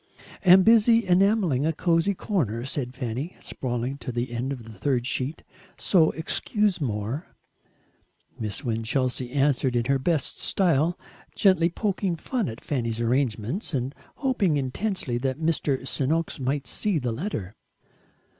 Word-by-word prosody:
"Am 185 0 +8
busy 230 +1 +5
enamelling 185 - +3
a 160 - +2
cosey 170 +4 +1
corner," 125 - -1
said 130 -2 -4
Fanny, 130 +7 -4
sprawling 125 +2 -3
to 130 - -5
the 120 +1 -3
end 120 +3 -2
of 125 -5 -6
her 115 - -10
third 120 +4 0
sheet, 130 +4 -3 0.3
"so 165 -5 +4
excuse 200 +4 0
more." 115 - -3 1.1
Miss 105 -3 -4
Winchelsea 125 +2 -1
answered 135 -2 +1
in 120 -1 +1
her 135 +1 +2
best 155 0 0
style, 170 -2 +2 0.4
gently 185 -4 +4
poking 195 -1 -1
fun 225 +5 -2
at 110 - -8
Fanny's 115 -5 -2
arrangements 120 - -1
and 130 +1 -2 0.2
hoping 225 - +1
intensely 135 - -2
that 130 0 -1
Mr. 150 -4 0
Sen'oks 155 +5 -1
might 135 +2 -1
see 205 -5 0
the 125 -5 -1
letter. 115 - -4
140 Hz, 135 wpm, -26 LUFS, 125-180 Hz, 1.1 s, Am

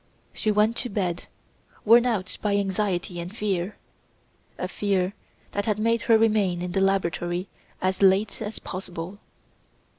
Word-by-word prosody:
She 215 - -1
went 210 +2 +3
to 245 - -3
bed, 180 -4 -2 0.6
worn 235 +3 +7
out 200 -6 -1
by 205 -1 +1
anxiety 190 -3 -1
and 180 +6 -7
fear 195 -2 -1 0.8
a - - -2
fear 195 -2 0 0.4
that 205 0 -2
had 210 -2 +1
made 230 +2 +2
her 225 - +8
remain 210 -6 +2
in 180 - -3
the 190 +1 +1
laboratory 180 -1 0 0.3
as 185 +1 0
late 195 +3 +3
as 215 0 -4
possible. 185 +1 -6
195 Hz, 145 wpm, -25 LUFS, 180-215 Hz, 0.8 s, her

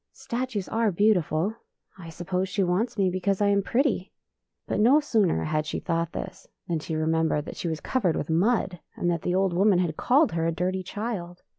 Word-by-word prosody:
" - - -59
Statues 235 -5 -3
are 225 -1 +1
beautiful. 185 -1 +2 0.4
I 175 -4 -10
suppose 180 +3 -3
she 195 +1 0
wants 195 +7 0
me 190 -2 +2
because 185 +1 0
I 205 -1 +3
am 200 0 +3
pretty! 235 -3 0 0.3
" - - -56
But - - -1
no 250 +8 +6
sooner 220 - +1
had 155 0 -1
she - - -3
thought 170 -1 -1
this - - -7 0.2
than 170 -2 -1
she 160 +1 -4
remembered 160 -1 +1
that - - -7
she - - -4
was 160 -2 -3
covered 195 -11 0
with - - -3
mud, 180 +2 +1 0.2
and 175 - 0
that 170 -2 -2
the 180 - -1
old 190 -1 +2
woman 195 +2 +4
had 175 -4 -1
called 285 +5 +3
her 165 0 0
a - - +1
dirty 180 +3 -1
child. 185 -3 -5
185 Hz, 210 wpm, -26 LUFS, 165-210 Hz, 0.4 s, no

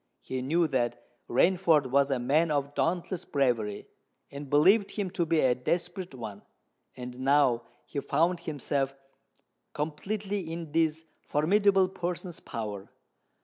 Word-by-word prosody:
He 130 -1 -4
knew 165 +6 +2
that 125 -3 -1 0.2
Rainford 160 -1 +3
was 140 +1 +4
a 135 - +1
man 145 +7 +2
of 145 -1 -1
dauntless 175 +3 -1
bravery, 120 -7 0 0.4
and 140 0 -8
believed 190 +9 +5
him 200 -4 -2
to 175 -3 -1
be 165 -1 +3
a 130 -1 +4
desperate 175 +6 -3
one; 105 -5 -7 0.6
and 125 0 -7
now 130 -3 +3 0.2
he 145 - -4
found 170 +5 +1
himself 140 -4 -2 0.8
completely 190 +4 -3
in 165 -2 -6
this 160 0 +1 0.2
formidable 195 +5 +3
person's 180 -1 -5
power. 105 -3 -6
150 Hz, 130 wpm, -29 LUFS, 130-175 Hz, 0.8 s, believed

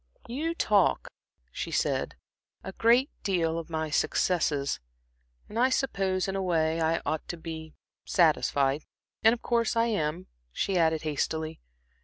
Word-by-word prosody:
"You 310 +8 -2
talk," - - +2 0.4
she - - -4
said, - - 0 0.5
"a - - -6
great 245 +5 +3
deal 165 -4 0
of 165 - -8
my 160 -1 -2
successes, 150 -4 +1 0.7
and 225 - -4
I 255 +2 +4
suppose, 195 -9 0
in 195 - -2
a 195 - -1
way, 165 -3 +1
I 160 +1 +1
ought 155 -1 -2
to 175 - -5
be 160 -1 -8 0.3
satisfied. 145 -4 +2 0.4
And 225 - +6
of 235 - -3
course 235 -1 +1
I 230 0 +3
am," 175 -5 -1 0.3
she 195 - -1
added, 160 -2 +2
hastily. 155 +1 -2
170 Hz, 145 wpm, -28 LUFS, 160-225 Hz, 0.7 s, And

